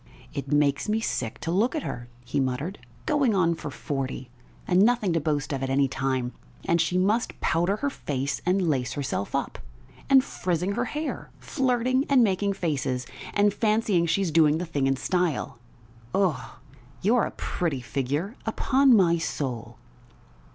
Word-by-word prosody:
"It 140 0 -5
makes 145 +4 +2
me 215 +1 +2
sick 120 - -2
to 165 - -2
look 220 - +2
at 310 - -2
her!" 120 0 -5 0.2
he 130 +4 -1
muttered. 135 +8 -2 0.3
"Going 280 -8 +2
on 170 -3 +3
for 155 - -6
forty, 135 -3 -4 0.4
and 180 0 +4
nothing 220 -4 +3
to 165 - +2
boast 145 -2 -1
of 135 - -3
at 135 - -2
any 135 +1 +3
time, 130 -2 -1 0.3
and 170 0 +3
she 180 +2 0
must 210 +6 +1
powder 175 +5 +1
her 280 +7 -1
face 140 - -3
and 185 0 +1
lace 130 -5 0
herself 135 -8 -3
up! - - -2 0.5
And 270 -1 +7
frizzing 180 -5 -2
her 240 +4 -1
hair! 300 +5 -4
Flirting 255 -1 0
and 270 -3 +6
making 200 -1 +1
faces, 135 -8 -2 0.3
and 205 0 +4
fancying 210 -5 +2
she's 175 +1 +1
doing 155 -1 +4
the 175 - -3
thing 145 -5 0
in 135 - +2
style! 175 -6 -1 0.6
Ugh! 185 -8 +1 0.5
you're 225 +3 +3
a - - -3
pretty 160 -7 -2
figure, 145 - -2
upon 265 +3 +4
my 170 -3 +4
soul!" 130 -7 -4
170 Hz, 165 wpm, -26 LUFS, 140-210 Hz, 0.6 s, And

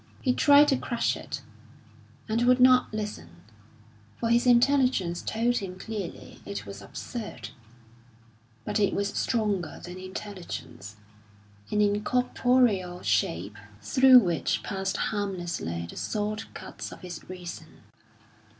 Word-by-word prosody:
He 255 - +1
tried 290 +2 +6
to 270 - +3
crush 235 -2 -1
it, - - -7 0.8
and 220 +2 0
would 250 0 +5
not 255 0 +5
listen, 210 -1 -6 0.8
for 230 - -1
his 240 +2 +3
intelligence 245 -8 +3
told 240 +2 0
him 185 -3 -5
clearly 210 -3 -7
it 100 +1 -6
was 100 0 -9
absurd; 210 - -7 1.2
but - - -1
it 200 -2 +2
was 200 0 0
stronger 205 -8 -1
than 180 +1 -8
intelligence, 185 - -7 0.7
an 210 - +1
incorporeal 210 -3 +1
shape 105 -2 0 0.2
through 260 - +6
which 175 -8 +2
passed 195 -1 -2
harmlessly 175 - -3
the - - -11
sword 215 +1 -3
cuts - - -7
of - - -11
his 180 -2 -9
reason. 175 -3 -9
205 Hz, 120 wpm, -27 LUFS, 175-240 Hz, 1.2 s, tried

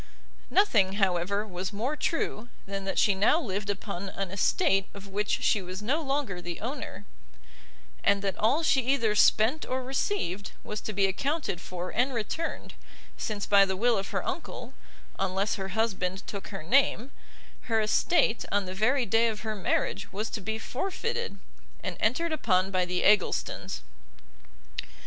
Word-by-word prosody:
Nothing, 215 - +4
however, 195 +1 +1
was 185 -2 -4
more 235 +9 -2
true, 245 -8 -2 0.2
than 195 0 -4
that 195 - -2
she 205 - +5
now 205 +11 +4
lived 205 - -3
upon 200 -1 -3
an 195 -1 -4
estate 195 - +2
of 200 0 -9
which 205 +1 -1
she 210 - +3
no 210 - -2
longer 275 -6 -1
was 180 - -9
the 175 -1 -5
owner, 255 +7 -5 1.0
and 200 0 +3
that 195 -2 0
all 270 +10 +3
she 275 -4 +4
either 245 -4 +2
spent 220 +7 +4
or 255 0 -2
received 255 - -2
was 210 - -5
to - - -4
be 195 0 +3
accounted 270 - -1
for 180 0 -5
and 250 +2 +1
returned, 235 +9 -3 0.4
since 210 -2 -3
by 200 -1 +6
the 190 -1 0
will 235 +3 +3
of 195 -1 -2
her 195 -4 -2
uncle, 265 -4 -5 0.5
unless 195 +2 0
her 190 -3 -3
husband 190 -4 0
took 200 -2 -6
her 195 -5 -6
name, 260 - +3 0.6
her 225 -1 +3
estate 220 +2 +2
on 205 -1 +2
the 185 - -5
very 245 +7 +2
day 225 +1 +3
of 215 -2 -3
her 220 -1 -2
marriage 200 0 -1
was 210 +3 -3
to 220 - -3
be 220 +3 -2
forfeited, 390 - -3 0.5
and - - -3
entered 290 +10 +1
upon 190 -9 +2
by 185 -1 +2
the 180 0 -1
Egglestons. 190 - +2
210 Hz, 165 wpm, -28 LUFS, 195-250 Hz, 1.0 s, by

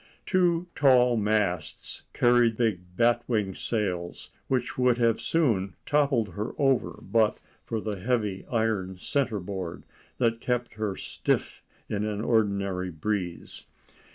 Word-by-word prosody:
Two 175 -2 +2
tall 125 -3 +5
masts 105 -6 -1
carried 120 -2 +3
big 110 -6 +1 0.2
bat 120 0 +3
wing 105 -5 0
sails, 90 -5 -3 0.2
which 130 -2 -1
would 125 -1 +3
have 115 -2 +2
soon 110 - +1
toppled 140 -7 +2
her 105 +3 -4
over 135 -3 +2
but 110 -2 +2 0.3
for 115 - -1
the 105 -2 -4
heavy 105 -3 -1
iron 110 -5 0
centre 125 +1 -1
board 90 -2 -5 0.3
that 115 -1 +1
kept 125 -1 -1
her 105 -2 -2
stiff - - -2 0.3
in 105 0 -2
an 105 -1 -2
ordinary 100 -5 +1
breeze. 90 +1 -4
110 Hz, 125 wpm, -27 LUFS, 100-120 Hz, 0.3 s, tall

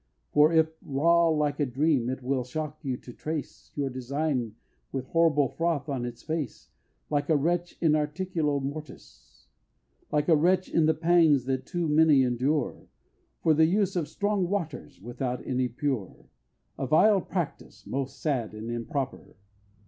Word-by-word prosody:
For 150 +2 +6
if 160 -1 +3
raw 170 +5 +3
like 150 -2 +1
a 145 - +2
dram, 130 -1 +1
it 130 0 -4
will 130 0 0
shock 155 +4 -5
you 130 -3 -2
to 120 - -12
trace 155 +2 -6
Your 140 -2 -1
design 130 -2 -2 0.4
with 130 -1 -3
a - - -25
horrible 160 -4 +3
froth 165 -3 -1
on 130 -3 -2
its 120 0 -7
face, 155 -7 -4 0.4
Like 145 0 0
a 160 - +4
wretch 175 +4 -1
in 155 -3 +4
articulo 155 -1 -1
mortis. 140 - -9 0.7
Like 150 0 +1
a 165 - +6
wretch 180 +4 +2
in 160 -2 +4
the 160 - +3
pangs 165 -5 +4
that 130 0 -2
too 175 -3 -1
many 150 -2 +5
endure 130 +3 -1 0.6
From 155 -2 +4
the 160 - +6
use 195 +1 +1
of 165 -4 0
strong 205 -3 -1
waters, 165 - -4
without 125 +4 -4
any 130 -1 0
pure, 125 - -3 0.5
A 135 - -2
vile 195 +7 +5
practice, 175 -3 -5
most 135 0 -4
sad 125 -8 -1
and 110 +2 -6
improper! 130 +3 -4
150 Hz, 160 wpm, -27 LUFS, 130-165 Hz, 0.7 s, For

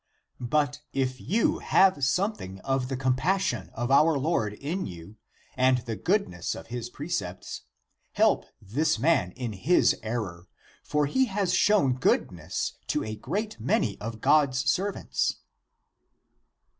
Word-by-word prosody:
But 145 0 +1
if 130 -1 -1
you 215 +5 +1
have 185 -8 +3
something 130 - -1
of 135 -1 -1
the 135 -1 -3
compassion 130 - 0
of 120 +2 -2
our 150 +2 +5
Lord 135 -8 0
in 155 - -3
you 85 +4 -10 0.4
and 130 0 +4
the 115 -2 -5
goodness 140 - -1
of - - -9
his 120 -1 -4
precepts, 100 - -5 0.5
help - - +3
this 145 +11 0
man 150 - +2
in 125 -4 -4
his 145 - +3
error; 100 -6 -4 0.3
for 150 0 0
he 260 - +2
has 195 -4 -1
shown 190 -9 +4
goodness 125 - -1
to - - 0
a 110 0 -4
great 200 - -4
many 110 -3 0
of 110 0 -6
God's 140 -3 +3
servants." 195 +8 0
135 Hz, 130 wpm, -27 LUFS, 110-165 Hz, 0.5 s, our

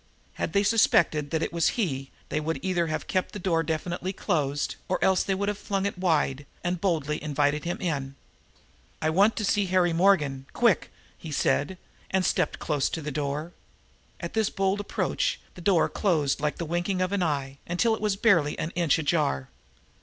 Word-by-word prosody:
Had - - -3
they 200 0 +3
suspected 170 -8 +3
that 160 +1 0
it - - -3
was 170 -2 +2
he 135 - -1 0.2
they 155 - 0
would 160 +1 -2
either 175 -3 +1
have 155 0 -3
kept 185 -1 -1
the - - -4
door 175 -4 +1
definitely 170 +3 -2
closed, 145 -8 -1
or 185 - +2
else 190 -1 +4
they 195 - 0
would 200 +1 -2
have 205 0 -2
flung 195 -2 -2
it 200 - 0
open 145 -5 +1 0.2
and 175 -1 -1
boldly 155 -6 0
invited 145 0 0
him 175 - -2
in. 140 -6 -2 0.8
"I 155 - +1
want 200 +7 +4
to 215 - -1
see 200 0 +2
Harry 180 -2 +2
Morgan 150 -7 +2
quick!" 235 -6 +2 0.3
he 160 - -8
said 145 +4 +1 0.3
and 190 -1 +1
stepped - - +1
close 145 -4 0
to 165 - -4
the 150 - -3
door. 150 +4 -3 0.7
At - - -5
his 220 -2 +2
bold 195 +1 0
approach 205 - -1
the 180 - -11
door 175 -2 +4
was - - -1
closed 155 -8 +2
like 150 0 0
the 170 - -3
winking 175 +3 -1
of 185 0 0
an 200 -1 0
eye, 140 -4 -1
until 180 +7 +2
it 220 - -3
was 210 -2 +1
barely 195 -9 +3
an 155 - -3
inch 170 -4 +2
ajar. 145 - 0
170 Hz, 195 wpm, -27 LUFS, 150-190 Hz, 0.8 s, else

